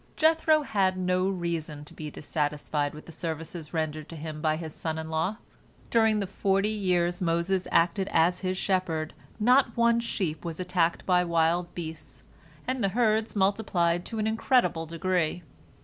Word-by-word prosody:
Jethro 315 -1 +4
had 190 -7 +1
no 185 +1 +1
reason 165 -5 -3
to - - -12
be 155 -1 -6
dissatisfied 145 -1 -2
with 150 - -11
the - - -11
services 160 0 -5
rendered 155 -2 -3
to 165 - -8
him 155 0 -6
by 155 -1 +2
his 160 -1 -6
son 160 -1 -3
in 160 0 -5
law. 165 +7 0 0.5
During 220 -2 +4
the 200 - -1
forty 195 +2 +1
years 180 -4 0
Moses 175 +2 0
acted 185 +3 +2
as 175 +2 +3
his 185 -1 -2
shepherd 180 -5 -1 0.3
not 245 +1 +4
one 235 0 +4
sheep 185 -9 -3
was 165 -1 -5
attacked 175 -2 0
by 180 -1 +4
wild 170 +1 +1
beasts, 155 -6 -8 0.4
and 255 -2 -1
the 195 - +3
herds 220 +1 +1
multiplied 190 -4 +1
to 225 - -5
an 215 - 0
incredible 220 -6 +2
degree. 175 0 -1
175 Hz, 165 wpm, -28 LUFS, 160-200 Hz, 0.5 s, Jethro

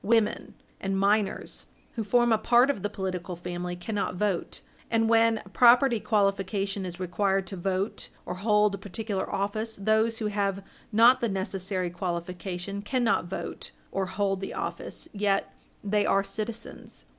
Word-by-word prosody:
Women 225 0 +1 0.2
and 195 0 -1
minors, 200 0 0 0.2
who 225 - -3
form 240 +3 +3
a 220 - +2
part 240 +4 +5
of 240 - -7
the 205 - -1
political 185 -3 -4
family, 175 +1 -4
cannot 200 +2 -3
vote, 195 -1 -1 0.3
and 225 -1 +2
when 225 0 +4
a - - -13
property 240 +2 +5
qualification 195 -2 0
is 175 0 -8
required 190 +1 0
to 195 - -6
vote 190 +3 -2 0.2
or - - -3
hold 210 +2 +3
a 200 - -4
particular 200 0 -4
office, 215 +3 -2
those 220 +3 +2
who 220 - -3
have 200 -2 -1 0.3
not 230 +4 +6
the 235 - +1
necessary 190 -2 -2
qualification 180 +2 -4
cannot 235 -3 +1
vote 175 - -6 0.2
or 195 -1 -1
hold 195 0 -1
the 195 - -5
office, - - -5
yet 200 -1 0 0.3
they 205 0 +2
are 195 -1 +3
citizens. 220 +3 -6
200 Hz, 155 wpm, -27 LUFS, 190-220 Hz, 0.3 s, not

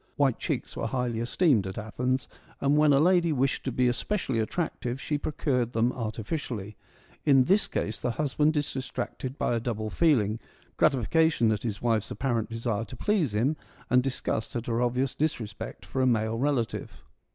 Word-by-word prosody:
(White 135 -4 +2
cheeks - - -3
were - - -2
highly 125 -3 -1
esteemed 120 - +2
at 95 - -6
Athens, 125 +4 -1 0.3
and 140 +1 +2
when 150 0 +5
a 140 - +5
lady 175 +1 +4
wished 135 -1 0
to 130 - 0
be 125 +1 +2
especially 130 - -1
attractive, 125 0 -2
she 145 +1 -2
procured 125 -5 -1
them 115 +3 +2
artificially. 110 - -4 0.5
In 135 -3 +6
this 195 +9 +3
case 105 +1 -2
the - - 0
hus 140 +3 -2
band 150 +1 +3
is 145 - -1
distracted 130 0 -4
by - - 0
a 115 - +1
double 110 -2 -3
feeling: 115 -10 +2 0.4
gratification 135 -1 +3
at 105 - -1
his 105 -4 -4
wife's 115 -2 +1
apparent 120 -5 -1
desire 115 -1 -2
to 125 - -10
please 175 - +1
him, 135 +9 +1 0.3
and 125 0 +6
dis 130 0 -3
gust 110 - -2
at 120 -1 -2
her 115 0 0
obvious 125 +2 +1
disrespect 115 -9 -3
for 130 - -2
a 130 - +4
male 110 -1 +1
relative.) 135 -4 -1
125 Hz, 180 wpm, -28 LUFS, 115-145 Hz, 0.5 s, In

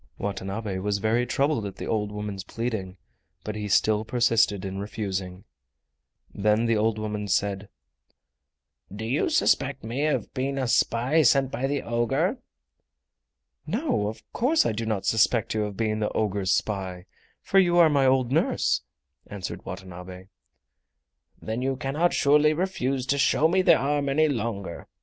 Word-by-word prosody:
Watanabe 100 0 -4
was 100 +1 -1
very 115 +4 +1
troubled 140 -1 +1
at 100 - -8
the - - -6
old 105 -2 -1
woman's 105 -2 -5
pleading, 100 -3 -4 0.5
but 105 - -5
he 105 -1 -4
still 105 +2 +2
persisted 115 -4 +2
in 95 0 -4
refusing. 95 -3 -4 0.9
Then 105 +3 +2
the 115 -1 +2
old 110 +1 +1
woman 105 -1 -4
said: 100 0 -1 1.2
"Do 105 +3 -6
you 130 - 0
suspect 140 - +1
me 125 +7 -1
of 155 - -2
being 135 +1 -2
a 130 -2 -1
spy 125 +6 +2
sent 135 -1 +3
by 135 +2 -1
the 140 0 -2
ogre?" 120 0 0 1.3
"No, 220 - 0
of 110 0 -7
course 295 +7 +2
I - - +1
do 110 +1 -4
not 105 -3 -2
suspect 110 0 +2
you 110 -1 0
of 100 -2 -7
being 110 -1 0
the 105 - 0
ogre's 100 -3 0
spy, 95 -2 -2 0.4
for 195 - +3
you 175 -2 +3
are 170 -2 +7
my 140 -3 +3
old 130 -2 +2
nurse," 155 +4 +1 0.5
answered 95 -3 -7
Watanabe. 95 0 -9 1.1
"Then 110 +3 -4
you 135 +1 0
cannot 145 +7 0
surely 150 +1 +4
refuse 140 -7 -1
to 140 +1 0
show 155 +2 +3
me 185 +3 +2
the 185 - +6
arm 140 +1 0
any 155 +3 +3
longer." 105 - -4
110 Hz, 155 wpm, -26 LUFS, 100-135 Hz, 1.3 s, are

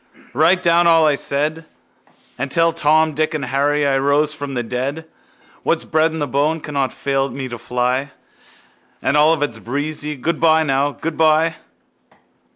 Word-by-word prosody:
Write 165 +7 +3
down 170 0 +4
all 165 -1 +5
I 150 - +3
said 150 +3 -2 0.7
And 135 +2 -4
tell 165 +3 +2
Tom, 155 0 +2
Dick 155 +2 -1
and 145 -3 -3
Harry 145 +3 0
I 135 -1 +2
rose 145 +2 +1
from 145 -3 -6
the 120 - -1
dead. 130 +7 -4 0.6
What's - - 0
bred 160 +1 +1
in 160 - -5
the 145 -2 -2
bone 145 +5 0
cannot 140 -4 -2
fail 135 0 -1
me 135 -1 -6
to 120 -1 -7
fly 125 +3 -1 0.9
And 140 - +1
Olivet's 150 -6 +2
breezy... 145 +5 -3
Goodbye, 160 +3 +2
now, 140 0 0
goodbye! 160 +1 +1
150 Hz, 155 wpm, -19 LUFS, 135-160 Hz, 0.9 s, all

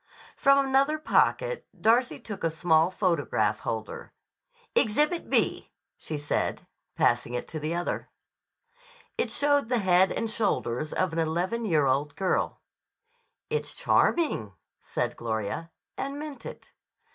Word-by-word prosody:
From 275 -1 +4
another 275 +3 +2
pocket - - +1
Darcy 235 +3 +3
took 205 -3 -8
a 165 - +3
small 160 +1 +3
photograph 150 - 0
holder. 110 -1 -5 0.6
"Exhibit 300 +10 +2
B," - - +1 0.3
she 155 - -5
said, 145 0 -2 0.3
passing 120 0 +1
it 125 - -4
to 155 - -5
the 155 +3 -2
other. 175 0 -3 1.1
It - - 0
showed 285 -4 +2
the 250 - +2
head 190 -2 +4
and 230 - -1
shoulders 155 - -1
of 185 -3 0
an 165 - -1
eleven 175 +8 -1
year 155 -6 +3
old 140 +2 0
girl. 190 +1 -1 0.9
"It's 460 - -2
charming," 205 - +1 0.3
said - - -2
Gloria, 110 +7 -3 0.3
and 275 +1 -3
meant 300 -2 -7
it. - - -11
180 Hz, 130 wpm, -27 LUFS, -, 1.1 s, From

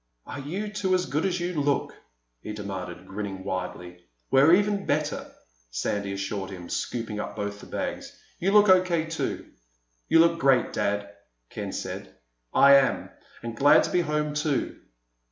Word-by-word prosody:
"Are - - -7
you 185 +10 -4
two 190 -2 +1
as 180 0 0
good 155 +3 0
as 180 -1 -1
you 175 -3 -1
look?" 140 0 0 0.5
he 105 - -6
demanded, 95 -4 -6
grinning 95 -1 -5
widely. 90 -2 -5 0.3
"We're 135 +4 +6
even 205 0 0
better," 150 0 -1 0.4
Sandy 100 +11 -2
assured 100 0 -4
him, 90 -3 -9
scooping 110 +4 -3
up - - -5
both 100 -1 -4
the - - -12
bags. - - -5 0.2
"You 190 +3 +1
look 210 0 +6
O.K. 185 -3 +4
too." 165 0 -4 0.6
"You - - +5
look 165 0 +5
great, 135 -5 +3
Dad," 100 0 -1 0.4
Ken - - -5
said. - - -6 0.4
"I 140 0 +7
am. 135 - 0 0.3
And 115 -1 -5
glad 145 +4 +6
to - - -3
be 180 - +3
home 150 -2 -1
too." 150 -1 -1
140 Hz, 160 wpm, -26 LUFS, 100-170 Hz, 0.6 s, I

